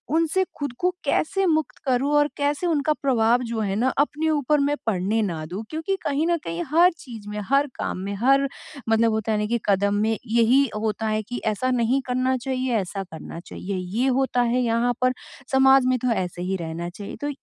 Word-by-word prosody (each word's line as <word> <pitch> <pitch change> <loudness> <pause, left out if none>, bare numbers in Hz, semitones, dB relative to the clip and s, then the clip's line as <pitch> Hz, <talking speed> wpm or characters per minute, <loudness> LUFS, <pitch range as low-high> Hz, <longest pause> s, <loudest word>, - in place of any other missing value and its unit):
उनसे 330 +3 +2
खुद 285 -4 -3
को 360 +1 +2
कैसे 385 +7 +1
मुक्त 315 -2 0
करूँ 265 +2 +1
और 295 0 +3
कैसे 290 +4 0
उनका 305 -2 +2
प्रभाव 245 -2 +3
जो 225 - -2
है 195 -2 -1
ना 245 +5 +2
अपने 300 +2 +1
ऊपर 295 -1 +2
मैं 285 +1 +1
पढ़ने 210 +2 +1
ना 165 -5 -3
दूँ? 185 +7 -6
क्योंकि 320 +5 -1
कहीं 295 +3 0
न 340 -1 +2
कहीं 165 +1 -3
हर 350 +3 +6
चीज़ 225 -5 -10
में, 210 - -4
हर 280 +1 +3
काम - - -3
में, 200 +2 -4
हर 275 +6 +3 0.4
मतलब 225 0 +3
होता 220 0 -1
है 210 - +1
ना 210 - 0
कि 235 +1 0
कदम 200 +1 +2
में 220 0 +1
यही 235 +4 +4
होता 215 0 -2
है 215 0 0
कि 245 +4 -6
ऐसा 220 +4 0
नहीं 250 +2 +2
करना 255 +1 +1
चाहिए, 255 -1 -2
ऐसा 195 0 -3
करना 165 -2 -9
चाहिए। 185 +2 -6 0.2
ये 260 - +3
होता 260 -2 +1
है 240 +1 +1
यहाँ 235 +1 +1
पर 255 0 +3 0.4
समाज 265 0 +5
में 255 - +3
तो 250 0 0
ऐसे 180 -4 -2
ही 190 +2 -1
रहना 170 +1 -5
चाहिए। 200 +3 -8
तो 290 - -2
245 Hz, 210 wpm, -24 LUFS, 210-280 Hz, 0.4 s, हर